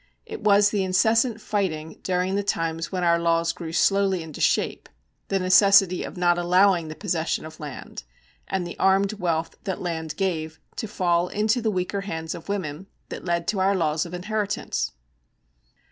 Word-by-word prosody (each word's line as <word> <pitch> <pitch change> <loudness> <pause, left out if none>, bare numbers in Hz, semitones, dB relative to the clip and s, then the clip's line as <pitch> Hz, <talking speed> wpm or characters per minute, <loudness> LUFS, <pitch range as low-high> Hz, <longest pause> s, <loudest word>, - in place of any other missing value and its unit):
It 440 -1 -7
was 205 0 +5
the 205 -2 0
incessant 225 +5 +2
fighting 165 -8 -3
during 185 0 0
the 200 - +1
times 165 -4 -2
when 185 -2 -2
our 170 -1 +3
laws 170 0 +1
grew 165 -2 -7
slowly 195 +1 +2
into 160 -2 -9
shape, - - +1 0.4
the 195 - 0
necessity 190 0 +5
of - - -8
not 175 -1 +3
allowing 180 -1 +3
the 155 - -7
possession 165 -3 -2
of 155 0 -11
land, 145 -4 -8 0.5
and 190 -2 -2
the 175 - -8
armed 195 +2 +3
wealth 165 -2 -1
that 190 -2 -2
land 160 -3 -4
gave, 160 -5 -2 0.2
to 220 - -3
fall 175 -4 +1
into 215 +5 +1
the 220 - +1
weaker 190 0 -2
hands 160 -5 -4
of 170 - -10
women, 185 -3 -4 0.2
that - - -7
led 170 -1 -1
to 205 - 0
our 195 +1 +3
laws 155 -3 +1
of 175 - -7
inheritance. 205 +2 -2
180 Hz, 175 wpm, -24 LUFS, 165-200 Hz, 0.5 s, was